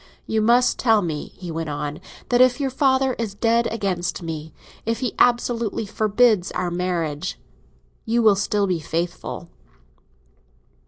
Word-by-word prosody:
"You 220 Hz, 0 st, 0 dB
must 240 Hz, +3 st, +3 dB
tell 225 Hz, -4 st, +3 dB
me," 155 Hz, -4 st, -3 dB
he 180 Hz, -2 st, -7 dB
went 165 Hz, -1 st, -3 dB
on, 145 Hz, 0 st, -4 dB, 0.3 s
"that 245 Hz, 0 st, +4 dB
if 255 Hz, +1 st, +5 dB
your 270 Hz, -2 st, -1 dB
father 265 Hz, -1 st, +2 dB
is 215 Hz, -4 st, -3 dB
dead 230 Hz, +2 st, +2 dB
against 190 Hz, -5 st, -2 dB
me, 160 Hz, -1 st, -5 dB, 0.3 s
if 230 Hz, 0 st, -1 dB
he 250 Hz, -, -1 dB
absolutely 235 Hz, -3 st, +2 dB
forbids 215 Hz, -1 st, +2 dB
our 180 Hz, -1 st, -2 dB
marriage, 175 Hz, -2 st, -2 dB, 0.7 s
you 235 Hz, +1 st, +1 dB
will 215 Hz, -2 st, +6 dB
still 205 Hz, 0 st, 0 dB
be 180 Hz, -3 st, 0 dB
faithful." 165 Hz, -, -4 dB
205 Hz, 145 wpm, -22 LUFS, 175-235 Hz, 0.7 s, will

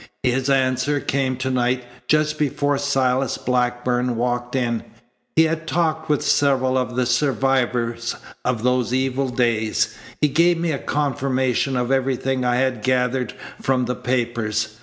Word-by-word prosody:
His 130 Hz, +2 st, +1 dB
answer 130 Hz, +1 st, +2 dB
came 130 Hz, -2 st, -1 dB
to 130 Hz, +1 st, -2 dB
night 125 Hz, 0 st, +1 dB, 0.2 s
just 150 Hz, 0 st, +2 dB
before 145 Hz, -1 st, 0 dB
Silas 135 Hz, -2 st, +1 dB
Blackburn 125 Hz, 0 st, 0 dB
walked 120 Hz, +1 st, -2 dB
in. 120 Hz, -3 st, 0 dB, 0.5 s
He 160 Hz, -, +6 dB
had 165 Hz, 0 st, -1 dB
talked 160 Hz, -1 st, 0 dB
with 150 Hz, -2 st, +2 dB
several 130 Hz, -2 st, +2 dB
of 125 Hz, -1 st, -1 dB
the 125 Hz, 0 st, +1 dB
survivors 125 Hz, -2 st, 0 dB, 0.3 s
of 120 Hz, -3 st, -1 dB
those 125 Hz, -1 st, +1 dB
evil 130 Hz, 0 st, 0 dB
days. 115 Hz, -3 st, 0 dB, 0.2 s
He 150 Hz, -, +4 dB
gave 170 Hz, +4 st, +3 dB
me 170 Hz, -1 st, 0 dB
a 140 Hz, -, -2 dB
confirmation 135 Hz, -2 st, 0 dB
of 125 Hz, +1 st, -1 dB
everything 135 Hz, -1 st, 0 dB
I 125 Hz, 0 st, +2 dB
had 125 Hz, -3 st, 0 dB
gathered 125 Hz, +1 st, 0 dB, 0.3 s
from 130 Hz, -2 st, +1 dB
the 125 Hz, -, -1 dB
papers. 110 Hz, -3 st, -2 dB
130 Hz, 145 wpm, -22 LUFS, 125-140 Hz, 0.5 s, He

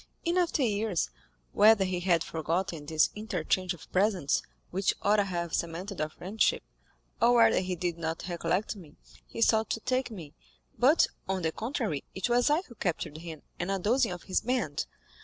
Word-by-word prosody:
In 340 Hz, +1 st, +1 dB
after 345 Hz, -5 st, +2 dB
years, 205 Hz, -, 0 dB, 0.4 s
whether 210 Hz, -2 st, +6 dB
he 185 Hz, -1 st, -1 dB
had 175 Hz, -2 st, +2 dB
forgotten 165 Hz, 0 st, -2 dB
this 160 Hz, 0 st, +3 dB
interchange 190 Hz, -4 st, -1 dB
of 165 Hz, -, -16 dB
presents, 185 Hz, -6 st, +2 dB, 0.3 s
which 190 Hz, +2 st, +1 dB
ought 205 Hz, +1 st, +4 dB
to 205 Hz, -, +3 dB
have 170 Hz, -3 st, -3 dB
cemented 175 Hz, +3 st, -3 dB
our 155 Hz, -, -1 dB
friendship, 195 Hz, +7 st, 0 dB, 0.6 s
or 235 Hz, +1 st, +6 dB
whether 225 Hz, -3 st, +6 dB
he 185 Hz, 0 st, -2 dB
did 175 Hz, -1 st, -3 dB
not 165 Hz, +1 st, -3 dB
recollect 175 Hz, +4 st, -1 dB
me, 175 Hz, -7 st, -13 dB, 0.3 s
he 230 Hz, -, -1 dB
sought 220 Hz, -1 st, +3 dB
to -, -, -1 dB
take 255 Hz, +2 st, 0 dB
me, 170 Hz, -10 st, -9 dB, 0.4 s
but, 280 Hz, +7 st, +5 dB, 0.2 s
on 190 Hz, -2 st, -1 dB
the 160 Hz, -, +1 dB
contrary, 220 Hz, -, -2 dB
it 190 Hz, +5 st, -1 dB
was 240 Hz, +2 st, +3 dB
I 300 Hz, +4 st, +3 dB
who 250 Hz, -, -14 dB
captured 170 Hz, -7 st, -3 dB
him 160 Hz, -3 st, -8 dB, 0.2 s
and 175 Hz, -, -2 dB
a 195 Hz, -, +1 dB
dozen 225 Hz, +5 st, +2 dB
of 175 Hz, -1 st, -6 dB
his 185 Hz, -, 0 dB
band. 230 Hz, -, -1 dB
190 Hz, 180 wpm, -29 LUFS, 170-225 Hz, 0.6 s, whether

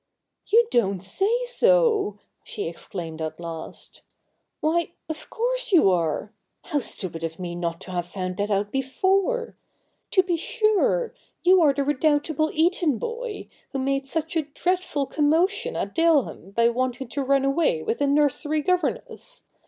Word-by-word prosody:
' -, -, -56 dB
You 465 Hz, +2 st, +6 dB
don't 195 Hz, -5 st, +1 dB
say 385 Hz, -, +1 dB, 0.2 s
so! 485 Hz, -, +3 dB
' -, -, -49 dB
she -, -, -5 dB
exclaimed 165 Hz, -1 st, -6 dB
at 155 Hz, 0 st, -4 dB
last. 165 Hz, -2 st, -7 dB, 0.3 s
' -, -, -51 dB
Why, 335 Hz, +2 st, 0 dB
of 315 Hz, -1 st, -6 dB
course -, -, -1 dB
you 315 Hz, -, +6 dB
are 175 Hz, +4 st, -1 dB, 0.3 s
How 300 Hz, -4 st, -1 dB
stupid 180 Hz, -9 st, -2 dB
of 165 Hz, 0 st, -4 dB
me 175 Hz, -2 st, -5 dB
not 170 Hz, -1 st, -3 dB
to 185 Hz, -, -8 dB
have 175 Hz, -1 st, -2 dB
found 185 Hz, 0 st, -4 dB
that 205 Hz, +1 st, -1 dB
out 205 Hz, 0 st, 0 dB
before! 385 Hz, -, 0 dB, 0.5 s
To 375 Hz, -, +4 dB
be 355 Hz, -2 st, 0 dB
sure 435 Hz, +5 st, +1 dB, 0.2 s
— -, -, -46 dB
you 365 Hz, +1 st, +6 dB
are 300 Hz, -3 st, +6 dB
the 280 Hz, 0 st, -1 dB
redoubtable 295 Hz, +2 st, +1 dB
Eton 320 Hz, -4 st, +2 dB
boy, 465 Hz, -, -5 dB, 0.3 s
who -, -, -1 dB
made 275 Hz, +1 st, -1 dB
such 320 Hz, +3 st, -2 dB
a 325 Hz, -, +3 dB
dreadful 360 Hz, -6 st, 0 dB
commotion 365 Hz, -, +1 dB
at -, -, -3 dB
Daleham 320 Hz, -, +2 dB
by 235 Hz, 0 st, +4 dB
wanting 255 Hz, +2 st, -2 dB
to 280 Hz, +3 st, -2 dB
run 275 Hz, 0 st, +2 dB
away 275 Hz, -, +1 dB
with 230 Hz, -, -2 dB
the 285 Hz, -, +2 dB
nursery 295 Hz, +1 st, +2 dB
governess. 450 Hz, +8 st, -2 dB
290 Hz, 165 wpm, -24 LUFS, -, 0.5 s, You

